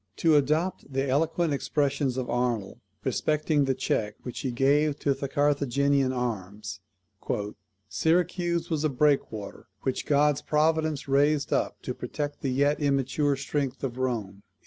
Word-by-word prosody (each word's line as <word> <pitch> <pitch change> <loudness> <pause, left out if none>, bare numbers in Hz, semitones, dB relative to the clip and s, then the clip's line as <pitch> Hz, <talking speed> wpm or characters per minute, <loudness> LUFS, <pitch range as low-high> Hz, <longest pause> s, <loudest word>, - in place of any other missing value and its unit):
To 160 -2 +3
adopt 155 +3 +1
the 135 +1 0
eloquent 160 +3 +1
expressions 140 -2 0
of 130 -1 -2
Arnold 120 -5 -1 0.2
respecting 150 -1 +1
the 135 -1 +1
check 105 -3 -1
which 125 - -6
she 135 - -2
gave 140 +4 +2
to 140 - +2
the 140 0 -5
Carthaginian 140 -1 +2
arms, 105 -4 -4 1.1
"Syracuse 170 - 0
was 155 -2 0
a 155 - +2
breakwater, 130 -7 0 0.2
which 130 - -2
God's 145 0 +3
providence 155 -1 +1
raised 140 +1 +2
up - - -1
to - - -3
protect 145 -1 -5
the 135 - -1
yet 140 +3 +2
immature 140 0 +1
strength 140 -1 -3
of 130 -1 -3
Rome." 110 -7 -2
140 Hz, 140 wpm, -27 LUFS, 130-150 Hz, 1.1 s, To